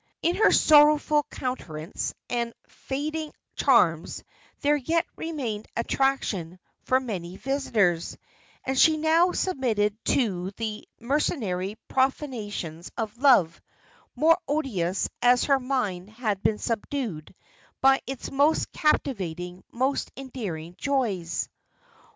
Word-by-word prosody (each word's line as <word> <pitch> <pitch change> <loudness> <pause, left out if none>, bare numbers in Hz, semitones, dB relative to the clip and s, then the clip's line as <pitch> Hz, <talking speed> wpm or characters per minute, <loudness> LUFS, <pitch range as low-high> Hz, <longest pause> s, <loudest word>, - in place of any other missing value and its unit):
In 340 +2 +2
her - - +5
sorrowful 300 -1 +5
countenance 170 -10 -4
and 235 -1 -2
fading 305 +3 -4 0.2
charms 170 - +2 0.4
there 295 0 +3
yet 325 +5 0
remained 255 -10 -4
attraction 230 -9 0 0.3
for 260 - +3
many 190 -8 -5
visitors; 215 -11 0 0.5
and 265 - -1
she 315 -1 +6
now 325 +3 +3
submitted 230 - 0
to 190 -8 +1
the 215 -2 -4
mercenary 220 - -1
profanations 220 - -2
of 220 -1 -3
love, 240 - +4 0.5
more 330 +3 +4
odious, 215 - 0
as 245 0 +5
her 275 -2 +3
mind 215 -8 -2
had 215 -3 -2
been 210 - +1
subdued 225 - -4 0.4
by 270 0 +5
its 270 -1 -5
most 285 +3 +2
captivating, 180 - -1
most 260 +3 -1
endearing 200 -12 -6
joys. 210 - -1
245 Hz, 105 wpm, -26 LUFS, 190-280 Hz, 0.5 s, she